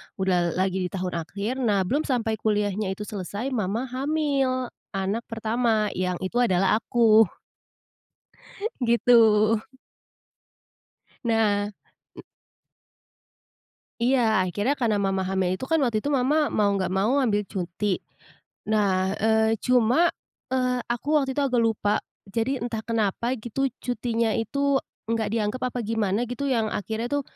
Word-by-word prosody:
Udah 180 -3 +1
lagi 185 0 0
di - - -11
tahun 180 -3 -2
akhir 200 +10 -4
nah 205 -6 +2
belum 285 +13 -1
sampai 225 -4 0
kuliahnya 205 -2 0
itu 210 - -6
selesai 210 +5 -5
mama 220 0 -1
hamil 270 -2 0 0.2
anak 195 +5 -2
pertama 225 -1 0
yang 180 0 0
itu 235 +6 -1
adalah 195 -3 +3
aku. 225 -2 +4 1.5
Gitu. 225 -2 +4 1.7
Nah. 210 -3 +1 2.3
Iya 235 -5 +3
akhirnya 205 - 0
karena 230 -6 0
mama 195 -1 0
hamil 190 -1 0
itu 225 +8 -4
kan 325 - +3
waktu 225 -4 +1
itu 290 - -2
mama 285 +3 +2
mau 205 -1 +2
nggak 190 -2 -1
mau 215 +9 +2
ambil 210 -4 +1
cuti. 185 +2 -2 0.7
Nah, 195 -3 +1
eee, 220 +1 +2
cuma, 250 +7 +4 0.4
eee, 255 -1 +1
aku 275 +6 -1
waktu 275 -3 +2
itu 290 - 0
agak 245 -3 +2
lupa, 215 -2 +1 0.3
jadi 230 +6 -1
entah 230 -2 -3
kenapa 230 +2 -1
gitu 240 +5 -2 0.2
cutinya 235 -2 -1
itu, 280 +5 +1 0.3
nggak 225 -2 0
dianggap 225 +3 -1
apa 250 - -5
gimana 215 -1 0
gitu 250 +4 -4
yang 230 -4 +1
akhirnya 220 +3 -3
tuh, 285 0 0
220 Hz, 130 wpm, -25 LUFS, 200-250 Hz, 2.3 s, aku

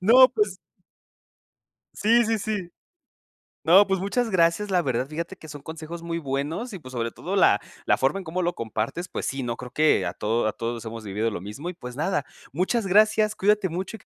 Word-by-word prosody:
No, 250 +7 +8
pues 420 -1 +1 1.4
Sí, 230 +3 +4
sí, 225 0 +1
sí. 205 -4 -3 0.9
No, 190 +5 +7
pues 195 -1 0
muchas 225 +5 0
gracias, 185 +2 +2
la 180 -1 +3
verdad, 130 -3 -1
fíjate 170 +5 -5
que 160 - -13
son 145 -1 -9
consejos 160 +2 -7
muy 170 0 -3
buenos, 155 - -3
y 190 - -7
pues, 130 - -11
sobre 115 -2 -2
todo - - -4
la - - +5 0.3
la - - +4
forma 135 +9 +1
en 195 - -7
como 180 +2 -2
lo 175 +1 0
compartes, 115 +10 -3
pues - - -4
sí, 135 -1 -2
no 120 -1 -2
creo 125 -1 -8
que 155 +4 +3
a - - -3
todo 110 +1 0
a - - -1
todos 115 0 -4
hemos 115 0 -7
vivido 105 +3 -1
lo 105 - -5
mismo 105 - -7
y, - - -9
pues, 125 -7 -9
nada. 155 +2 -1 0.3
Muchas 190 - 0
gracias, 215 +2 +4
cuídate 205 0 +2
mucho 185 +6 -4
y - - -20
q - - -21
170 Hz, 210 wpm, -25 LUFS, 130-200 Hz, 1.4 s, No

